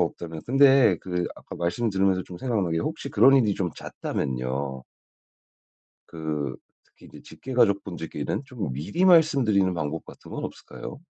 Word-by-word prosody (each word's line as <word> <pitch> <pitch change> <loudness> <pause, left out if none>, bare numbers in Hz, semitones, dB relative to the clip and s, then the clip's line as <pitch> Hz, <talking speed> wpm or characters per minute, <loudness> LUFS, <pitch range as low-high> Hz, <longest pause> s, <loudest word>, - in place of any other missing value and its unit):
없다면 80 -2 -3
근데 135 -6 +6
그 90 -1 -2
아까 - - -10
말씀 95 +7 -1
들으면서 95 -1 +2
좀 90 0 -10
생각난 105 -9 -1
게 80 - +1
혹시 155 - -3
그런 135 +1 +6
일이 105 -6 +3
좀 90 -3 -2
잦다면요 65 +1 -3 1.3
그 75 -3 -3 0.3
특히 - - -19
이제 - - -13
직계가족 120 -6 +1
분들께는 85 - -4
좀 120 - -5
미리 80 - -1
말씀드리는 135 - +4
방법 80 -1 -3
같은 - - -14
건 - - -5
없을까요? - - -8
95 Hz, 325 characters per minute, -25 LUFS, 80-125 Hz, 1.3 s, 근데